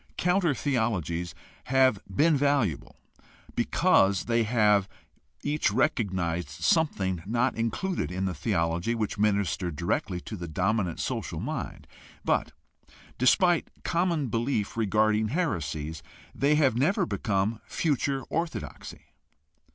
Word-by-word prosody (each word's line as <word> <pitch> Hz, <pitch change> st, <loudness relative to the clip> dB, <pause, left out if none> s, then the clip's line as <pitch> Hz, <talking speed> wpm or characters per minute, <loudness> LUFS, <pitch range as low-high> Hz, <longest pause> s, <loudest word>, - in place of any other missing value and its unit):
Counter 180 Hz, -4 st, +2 dB
theologies 95 Hz, -, -1 dB, 0.3 s
have 130 Hz, -5 st, +3 dB
been 150 Hz, -, +3 dB
valuable 140 Hz, -, 0 dB, 0.6 s
because 95 Hz, -1 st, +3 dB
they 115 Hz, 0 st, +2 dB
each 110 Hz, -, -1 dB
have 105 Hz, -4 st, +3 dB, 0.8 s
recognized 95 Hz, -, 0 dB
something 95 Hz, -, 0 dB
not 120 Hz, +4 st, +1 dB
included 115 Hz, -, -2 dB
in 95 Hz, +1 st, -2 dB
the 95 Hz, -, -1 dB
theology 85 Hz, +7 st, 0 dB
which 110 Hz, -2 st, -3 dB
ministered 100 Hz, -5 st, 0 dB
directly 90 Hz, +3 st, -1 dB
to 110 Hz, -, -7 dB
the 85 Hz, -3 st, -6 dB
dominant 90 Hz, +2 st, 0 dB
social -, -, -3 dB
mind; -, -, -5 dB, 0.4 s
but, -, -, +1 dB, 0.7 s
despite 170 Hz, +7 st, +4 dB, 0.2 s
common 170 Hz, -3 st, +1 dB
belief 115 Hz, -2 st, -1 dB
regarding 110 Hz, 0 st, +2 dB
heresies, 80 Hz, -, -2 dB, 0.3 s
they 145 Hz, +2 st, +2 dB
have 140 Hz, -6 st, +3 dB
never 145 Hz, +11 st, +2 dB
become 100 Hz, -1 st, 0 dB
some 115 Hz, -1 st, -8 dB
future 140 Hz, -3 st, 0 dB
orthodoxy. 165 Hz, +1 st, -5 dB
110 Hz, 110 wpm, -27 LUFS, 95-140 Hz, 0.8 s, despite